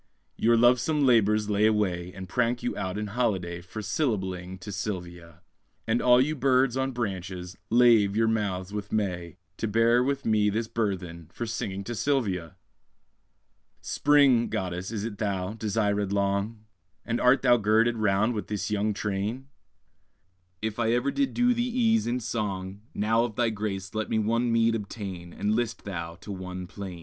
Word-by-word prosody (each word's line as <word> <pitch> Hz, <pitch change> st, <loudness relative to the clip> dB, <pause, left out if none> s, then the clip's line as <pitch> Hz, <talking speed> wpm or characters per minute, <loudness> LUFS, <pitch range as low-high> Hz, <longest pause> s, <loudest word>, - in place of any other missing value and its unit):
Your 115 Hz, +1 st, +3 dB
lovesome 125 Hz, +5 st, +3 dB
labours 110 Hz, -4 st, +3 dB
lay 105 Hz, +1 st, +3 dB
away, 90 Hz, -5 st, 0 dB
And 95 Hz, -1 st, -7 dB
prank 120 Hz, +1 st, 0 dB
you -, -, -2 dB
out 95 Hz, +1 st, -3 dB
in 105 Hz, -, -2 dB
holiday, 95 Hz, -6 st, -1 dB
For 95 Hz, +5 st, -7 dB
syllabling 95 Hz, -, -2 dB
to 105 Hz, -, -7 dB
Sylvia; 90 Hz, -5 st, -6 dB, 0.4 s
And 115 Hz, +2 st, +1 dB
all 125 Hz, 0 st, +6 dB
you 150 Hz, +4 st, +2 dB
birds 130 Hz, -2 st, +2 dB
on 135 Hz, 0 st, 0 dB
branches, 95 Hz, -6 st, -4 dB
lave 115 Hz, -4 st, +5 dB
your 115 Hz, +1 st, +3 dB
mouths 100 Hz, -4 st, -1 dB
with 105 Hz, -1 st, -5 dB
May, 90 Hz, -5 st, -2 dB, 0.2 s
To 115 Hz, -, -2 dB
bear 115 Hz, +3 st, +3 dB
with 140 Hz, +1 st, -1 dB
me 105 Hz, -2 st, +3 dB
this 110 Hz, +2 st, -1 dB
burthen 90 Hz, -8 st, -3 dB
For 120 Hz, -, -4 dB
singing 100 Hz, -4 st, -4 dB
to 120 Hz, -, -5 dB
Sylvia!_ 100 Hz, -, -1 dB, 1.2 s
Spring, 140 Hz, -5 st, +3 dB
goddess, 95 Hz, -4 st, -3 dB
is 105 Hz, -2 st, -4 dB
it 110 Hz, -3 st, -5 dB
thou, 100 Hz, -2 st, -2 dB
desirèd 105 Hz, -2 st, 0 dB
long? 100 Hz, +2 st, -1 dB, 0.4 s
And 115 Hz, 0 st, -1 dB
art 125 Hz, +2 st, +4 dB
thou 120 Hz, -2 st, +6 dB
girded 115 Hz, +2 st, +2 dB
round 105 Hz, +2 st, +2 dB
with 105 Hz, -, -4 dB
this 105 Hz, 0 st, -3 dB
young 105 Hz, 0 st, 0 dB
train? 105 Hz, +7 st, -3 dB, 1.1 s
If 110 Hz, 0 st, -3 dB
ever 120 Hz, +3 st, +2 dB
I -, -, -1 dB
did 280 Hz, -1 st, -1 dB
do 245 Hz, 0 st, +4 dB
thee 240 Hz, -, -1 dB
ease 230 Hz, -2 st, +2 dB
in 120 Hz, +1 st, 0 dB
song, 100 Hz, -3 st, -3 dB
Now 110 Hz, +3 st, +2 dB
of 120 Hz, -3 st, -3 dB
thy 120 Hz, -1 st, +1 dB
grace 100 Hz, -3 st, -4 dB
let 110 Hz, 0 st, -2 dB
me -, -, +1 dB
one 115 Hz, +3 st, +1 dB
meed 115 Hz, 0 st, +3 dB
obtain, 100 Hz, -5 st, -6 dB
And 105 Hz, +4 st, -1 dB
list 115 Hz, 0 st, -2 dB
thou 85 Hz, -4 st, -5 dB
to 105 Hz, -, -8 dB
one 90 Hz, -1 st, -6 dB
plain. 95 Hz, -1 st, -8 dB
105 Hz, 170 wpm, -27 LUFS, 95-120 Hz, 1.2 s, all